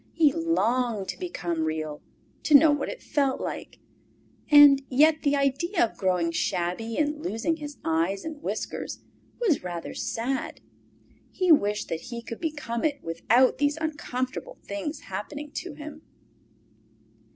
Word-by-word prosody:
He 305 Hz, -4 st, +4 dB
longed 250 Hz, -, 0 dB
to -, -, -5 dB
become 175 Hz, -, -2 dB
Real, 155 Hz, -1 st, -3 dB, 0.4 s
to 300 Hz, -, +4 dB
know 305 Hz, +2 st, +8 dB
what 290 Hz, -1 st, -1 dB
it -, -, -8 dB
felt 275 Hz, -3 st, 0 dB
like; -, -, -6 dB, 0.7 s
and 290 Hz, -2 st, +9 dB
yet 305 Hz, +4 st, +4 dB
the 285 Hz, -1 st, +2 dB
idea 280 Hz, -, +1 dB
of 225 Hz, -, -9 dB
growing 180 Hz, -3 st, +1 dB
shabby 180 Hz, +7 st, -2 dB
and 300 Hz, 0 st, 0 dB
losing 320 Hz, +3 st, -1 dB
his 295 Hz, -2 st, -8 dB
eyes 165 Hz, +5 st, 0 dB
and 310 Hz, -2 st, -6 dB
whiskers -, -, -4 dB, 0.4 s
was 405 Hz, -, +1 dB
rather 175 Hz, -2 st, -5 dB
sad. 255 Hz, +4 st, -3 dB, 0.7 s
He 370 Hz, -2 st, +1 dB
wished 210 Hz, -8 st, +3 dB
that 165 Hz, 0 st, -3 dB
he 235 Hz, -1 st, -6 dB
could 230 Hz, -, -7 dB
become 295 Hz, -8 st, -3 dB
it 290 Hz, -2 st, -1 dB
without 230 Hz, +11 st, +2 dB
these 290 Hz, +1 st, +1 dB
uncomfortable 295 Hz, -5 st, -4 dB
things 240 Hz, +10 st, -4 dB
happening 285 Hz, +10 st, -6 dB
to 350 Hz, -2 st, -6 dB
him. 300 Hz, 0 st, -9 dB
275 Hz, 140 wpm, -26 LUFS, 205-305 Hz, 0.7 s, and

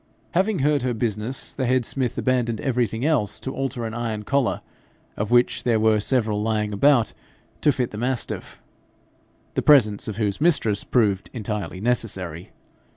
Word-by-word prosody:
Having 190 Hz, +2 st, +1 dB
heard 150 Hz, -2 st, +2 dB
her 125 Hz, -1 st, -1 dB
business, 110 Hz, +2 st, -2 dB
the 130 Hz, -2 st, -2 dB
head 130 Hz, -1 st, +2 dB
smith 130 Hz, -1 st, -2 dB
abandoned 120 Hz, -4 st, 0 dB
everything 120 Hz, -2 st, -1 dB
else 145 Hz, -10 st, +1 dB
to 130 Hz, -, -5 dB
alter 135 Hz, -3 st, -3 dB
an 110 Hz, -, -5 dB
iron 115 Hz, -2 st, -3 dB
collar, 140 Hz, +3 st, 0 dB, 0.5 s
of 105 Hz, 0 st, -3 dB
which 120 Hz, 0 st, +3 dB
there 115 Hz, -3 st, +2 dB
were 110 Hz, -1 st, +3 dB
several 110 Hz, -2 st, +1 dB
lying 105 Hz, -1 st, -1 dB
about, 125 Hz, +1 st, +3 dB, 0.5 s
to 150 Hz, -, +4 dB
fit 125 Hz, -3 st, -2 dB
the 105 Hz, -, -6 dB
mastiff, 125 Hz, 0 st, -3 dB, 0.9 s
the -, -, 0 dB
presence 110 Hz, -9 st, +4 dB
of 105 Hz, -2 st, -5 dB
whose 105 Hz, +1 st, -1 dB
mistress 115 Hz, -11 st, +2 dB
proved 105 Hz, -6 st, +1 dB
entirely 105 Hz, -5 st, -4 dB
necessary. 95 Hz, -7 st, -2 dB
115 Hz, 155 wpm, -23 LUFS, 105-130 Hz, 0.9 s, to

